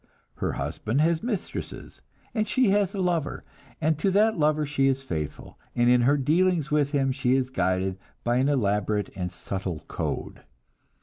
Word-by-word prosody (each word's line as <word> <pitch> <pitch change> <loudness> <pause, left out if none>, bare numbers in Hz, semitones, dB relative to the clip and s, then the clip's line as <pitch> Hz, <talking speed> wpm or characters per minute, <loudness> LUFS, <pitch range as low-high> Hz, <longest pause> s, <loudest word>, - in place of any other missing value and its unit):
Her - - -1
husband 115 +6 -2
has 165 0 +2
mistresses, 225 -5 -5 0.3
and 215 -2 0
she 250 -1 +3
has 200 -1 +2
a - - -3
lover, 170 -5 -1 0.4
and 155 -1 +1
to 195 - +2
that 215 +3 +3
lover 155 -1 +2
she 140 -1 +1
is 135 0 0
faithful, 80 - -5 0.2
and 120 0 +4
in 125 0 +5
her 140 +4 +4
dealings 160 +2 +2
with 150 -2 +2
him 135 -2 +1
she 130 -1 +1
is 130 -1 0
guided 95 -4 0 0.2
by 120 +1 +1
an 135 +3 +2
elaborate 105 -5 0
and 90 -2 -3
subtle 95 -2 -5
code. - - -4
140 Hz, 170 wpm, -26 LUFS, 120-170 Hz, 0.4 s, in